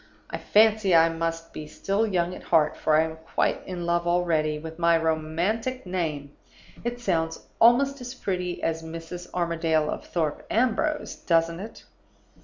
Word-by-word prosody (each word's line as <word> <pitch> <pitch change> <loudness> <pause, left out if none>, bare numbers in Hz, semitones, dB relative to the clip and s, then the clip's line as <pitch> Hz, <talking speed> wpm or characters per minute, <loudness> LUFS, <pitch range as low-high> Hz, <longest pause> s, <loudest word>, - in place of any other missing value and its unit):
I - - -4
fancy 215 -3 +4
I 165 0 +6
must 165 0 -3
be 155 - -7
still 200 +7 -1
young 180 -3 0
at - - -9
heart, 155 -2 +3
for 155 - +2
I 155 - +5
am 160 0 -5
quite 160 0 -1
in 180 -2 -4
love 170 0 0
already 165 -3 +1
with 160 +2 -9
my 170 -1 +4
romantic 170 +11 -1
name; 155 -6 -3 0.5
it 240 +1 -3
sounds 165 -7 -1
almost 270 +4 +4
as 250 +1 -7
pretty 180 -6 -3
as 165 0 -1
Mrs. 165 +2 -8
Armadale 165 -3 0
of - - -5
Thorpe 160 -4 -2
Ambrose, 255 +6 0
doesn't 165 0 +1
it? 215 +4 -9
170 Hz, 160 wpm, -26 LUFS, 160-200 Hz, 0.5 s, I